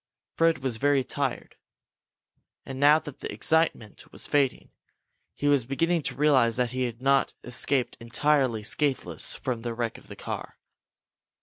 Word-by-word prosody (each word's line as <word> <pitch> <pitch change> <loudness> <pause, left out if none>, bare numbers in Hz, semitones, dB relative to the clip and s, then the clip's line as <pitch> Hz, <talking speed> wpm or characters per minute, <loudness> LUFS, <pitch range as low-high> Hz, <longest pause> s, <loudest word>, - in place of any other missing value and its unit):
Fred 165 0 +3
was 125 -4 0
very 140 +1 +2
tired. 135 0 -4 1.1
And, 135 0 -7
now 145 +2 +6
that 145 -3 -9
the - - -6
excitement 160 -10 -1
was - - -7
fading, 140 -4 0 0.6
he 145 - -2
was 140 -5 +3
beginning 165 +5 +1
to 125 - -9
realize 130 -5 +3
that 125 -1 0
he 130 0 -1
had 120 +1 -6
not 135 0 +2
escaped 125 +1 0
entirely 120 -1 +1
scatheless 140 +5 0
from 125 -3 -4
the 115 0 -4
wreck 115 -1 -3
of - - -21
the - - -10
car. - - -7
135 Hz, 150 wpm, -27 LUFS, 120-145 Hz, 1.1 s, now